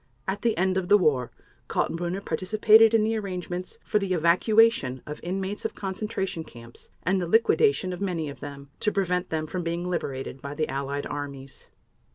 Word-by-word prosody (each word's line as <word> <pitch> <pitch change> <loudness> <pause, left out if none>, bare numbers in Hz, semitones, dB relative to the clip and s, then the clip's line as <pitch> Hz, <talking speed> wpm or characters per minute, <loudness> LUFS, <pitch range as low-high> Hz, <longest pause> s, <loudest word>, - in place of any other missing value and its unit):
At 195 +2 -2
the 230 -2 +1
end 185 +1 +2
of 180 - -5
the 205 - +8
war 145 - +2 0.4
Kaltenbrunner 175 +3 -2
participated 215 +6 +5
in 220 - +4
the 225 +1 +1
arrangements 180 -3 -4
for 210 - +2
the 195 -2 -1
evacuation 170 - +3
of 150 0 -7
inmates 190 +3 -3
of - - -3
concentration 195 -3 -3
camps, 115 -4 -10
and 185 +2 +1
the 175 - -2
liquidation 225 - +3
of 180 - -7
many 175 -6 -1
of 140 - -8
them, 140 -1 -9
to 210 - +1
prevent 180 -2 0
them 155 -1 -1
from 180 +4 -4
being 170 +1 -2
liberated 135 -6 -4
by 140 +1 -6
the 155 0 0
Allied 140 +1 -3
armies. 140 -2 -7
180 Hz, 180 wpm, -26 LUFS, 150-200 Hz, 0.4 s, the